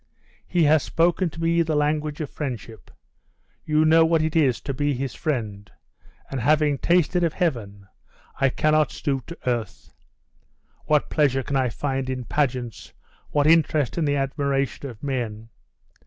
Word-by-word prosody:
He 175 -2 +2
has 155 0 +5
spoken 170 +2 +1
to 160 - -12
me 165 +1 +2
the 160 -2 0
language 150 +1 0
of 150 - -5
friendship 120 -6 -6 0.8
you 155 0 +2
know 160 +1 +6
what 160 -1 +2
it 155 0 -2
is 140 -7 +3
to 140 - -4
be 145 +1 0
his 130 -2 -4
friend 110 -8 -3 0.6
and 135 - -2
having 150 +1 +2
tasted 175 0 +2
of 165 -2 +1
heaven, 110 - -2 0.5
I 135 - +3
cannot 155 +3 +2
stoop 135 -4 -3
to 170 - -8
earth. 120 -4 -3 0.9
What 150 -1 +1
pleasure 135 -4 +2
can 140 - -3
I 130 -2 +2
find 135 +2 -3
in 130 -1 -3
pageants? 125 -2 -2 0.4
what 145 -1 +1
interest 155 -3 +3
in 170 - 0
the 145 -1 +1
admiration 140 0 -1
of 115 -4 -13
men? 115 -5 -4
145 Hz, 155 wpm, -24 LUFS, 130-155 Hz, 0.9 s, know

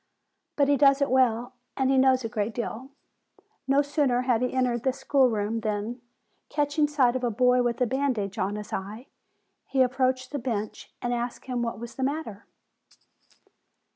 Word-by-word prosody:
But 280 -1 +3
he 285 0 +3
does 275 0 +5
it 280 -2 0
well, 250 -1 +2 0.2
and 265 -1 +2
he 270 - +3
knows 260 -1 +4
a - - 0
great 220 -1 -3
deal. 240 +2 -5 0.8
No 275 +2 +4
sooner 280 -4 +1
had 250 -3 +1
he 250 - 0
entered 250 -2 0
the 260 +1 0
schoolroom 245 -5 +1
than, 215 +2 -3 0.5
catching 295 0 +1
sight 265 -5 +2
of 255 - -2
a 240 - +2
boy 250 +2 +3
with 240 0 -1
a - - +5
bandage 245 -6 -1
on 195 +2 -1
his 210 0 -7
eye, 210 +6 -5 0.6
he 265 -1 +3
ap 250 0 -1
proached 255 -1 0
the 290 - -3
bench, 225 -4 -4
and 245 0 0
asked 240 0 -4
him 250 -2 -2
what 230 -2 -2
was 235 +1 -9
the 265 - -2
matter. 270 -7 -4
250 Hz, 180 wpm, -26 LUFS, 230-270 Hz, 0.8 s, does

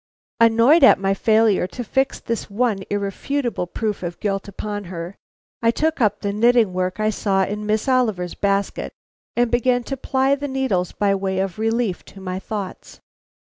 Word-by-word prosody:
Annoyed 230 +7 +5
at 270 - +8
my 195 0 0
failure 215 -2 +3
to 245 +6 -6
fix 265 +4 0
this 230 -1 -4
one 215 0 0
irrefutable 205 +2 -2
proof 210 +3 -3
of 175 -1 -5
guilt 195 -1 -2
upon 205 +1 -5
her, 175 +1 -7 0.5
I 230 - +3
took 315 +5 0
up 210 -2 +2
the 200 0 -2
knitting 230 -2 +3
work 185 +2 -2
I 215 0 +2
saw 195 -2 +1
in 210 +2 -4
Miss 215 +3 0
Oliver's 220 -9 +1
basket, 200 0 -1 0.4
and 240 -1 +2
began 245 +1 +2
to 270 - -4
ply 265 +1 +1
the 285 +1 -2
needles 260 -10 -1
by 200 -1 +1
way 190 -1 -2
of 190 0 -2
relief 225 -3 0
to 195 - -13
my 185 -1 -4
thoughts. 200 -1 -7
210 Hz, 170 wpm, -21 LUFS, 195-240 Hz, 0.5 s, at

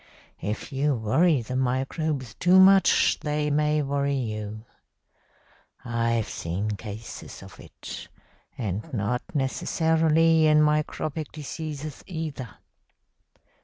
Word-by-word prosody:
If 105 +8 -4
you 140 +1 +1
worry 130 +6 +2
the 130 +3 -5
microbes 130 - -1
too 180 +8 +4
much 195 0 +5
they 150 0 -1
may 150 +1 +2
worry 140 0 0
you. 110 -3 -4 1.2
I've 115 -1 0
seen 95 +6 -3
cases 105 +2 -8
of - - -13
it, - - -9 0.5
and 110 - -4
not 120 +2 -1
necessarily 160 +3 +3
in 150 0 +5
microbic 150 0 0
diseases 155 -1 -6
either. 155 -8 -5
140 Hz, 100 wpm, -26 LUFS, 115-155 Hz, 1.2 s, much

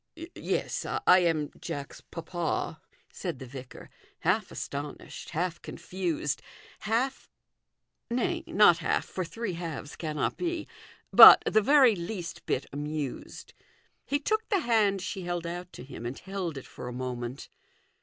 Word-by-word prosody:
" - - -56 0.2
Yes, - - -2
I 185 - +4
am 160 -4 +1
Jack's 140 -1 -6
papa," 170 0 -3 0.3
said - - -4
the 130 - -8
vicar, 130 0 -10 0.3
half - - +1
astonished, 145 +1 -6
half 170 +1 -2
confused 170 -6 -3 0.4
half, 235 +5 -1 0.8
nay, 240 0 0
not 190 -4 +6
half, 165 - 0
for 185 - -4
three 210 +3 -4
halves 165 -4 -6
cannot 155 -3 -2
be 345 -2 -2 0.5
but - - +12
the 215 - +3
very 265 -1 +6
least 175 0 -6
bit 130 - 0
amused. 145 -1 -5 0.5
He 285 - 0
took 435 +9 -1
the 400 -5 +2
hand 210 - +2
she 190 - -4
held 175 -1 -3
out 175 +1 -5
to - - -9
him 120 -3 -7
and 125 - -5
held 190 -5 -4
it 135 - -8
for - - -9
a - - -4
moment. 125 0 -5
175 Hz, 145 wpm, -29 LUFS, 145-210 Hz, 0.8 s, but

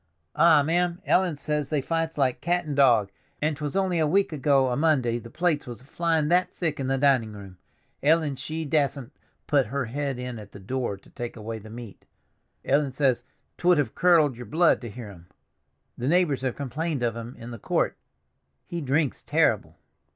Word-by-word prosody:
Ah, 160 -2 +6
ma'am, 175 +3 0
Ellen 180 -4 +2
says 150 0 -2
they 150 - +1
fights 165 +3 -2
like 130 -3 +1
cat 175 0 0
and 145 -2 -3
dog, 120 -8 +4 0.3
and 155 0 0
'twas 150 +3 -5
only 190 -3 +1
a 155 - +2
week 190 +2 +2
ago 135 -2 +3
a 125 - 0
Monday 130 -6 +2
the 115 - -11
plates 160 -1 0
was 120 0 -8
flyin' 160 +1 0
that 180 +1 +3
thick 160 -5 -2
in 135 - -2
the 135 0 +1
dinin' 130 -6 +2
room, 95 -3 -11 0.4
Ellen 155 -1 +2
she 155 +4 -5
dassent 140 -3 0 0.3
put 140 -5 +2
her 135 +3 -2
head 135 +2 -3
in 125 -2 -5
at 105 -1 -12
the - - -10
door 120 0 -3
to 95 - -21
take 120 -1 -6
away 110 +1 -5
the 110 +1 -12
meat. 115 -3 -10 0.6
Ellen 140 -1 +2
says 130 -2 +1 0.3
'twould 180 0 +4
have 145 - 0
curdled 165 -7 +4
y'r 125 - -8
blood 165 +5 +3
to 120 - -6
hear 110 0 -8
'em. 85 -2 -15 0.7
The 125 - -2
neighbors 165 -4 +2
have 130 -2 -2
complained 145 +1 -3
of 115 -1 0
'em 115 +2 -7
in 115 +1 -9
the 115 - -8
court. - - 0 0.7
He 170 -1 -5
drinks 145 +1 0
terrible!" - - +1
140 Hz, 195 wpm, -26 LUFS, 120-160 Hz, 0.7 s, Ah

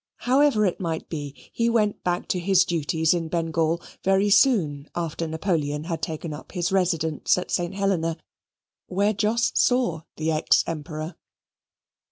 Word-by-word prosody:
However 260 -4 +3
it 180 - -1
might 165 -3 -3
be, 145 -3 -5 0.2
he 230 0 +1
went 215 -3 +1
back 175 0 -1
to 180 - 0
his 185 +1 +3
duties 160 -1 +1
in 170 -2 -2
Bengal 165 0 0 0.2
very 195 +2 +3
soon 160 - +3
after 165 -1 -3
Napoleon 155 -3 -1
had 165 0 -4
taken 160 -1 -4
up 150 - -10
his 175 -1 -1
residence 165 -6 +1
at 180 - -4
St. 175 +1 -1
Helena, 180 -5 0 0.7
where 200 +3 +1
Jos 220 +3 +1
saw 245 -11 +2
the 160 +1 -1
ex 155 0 +3
Emperor. 155 +1 -5
175 Hz, 150 wpm, -24 LUFS, 160-195 Hz, 0.7 s, However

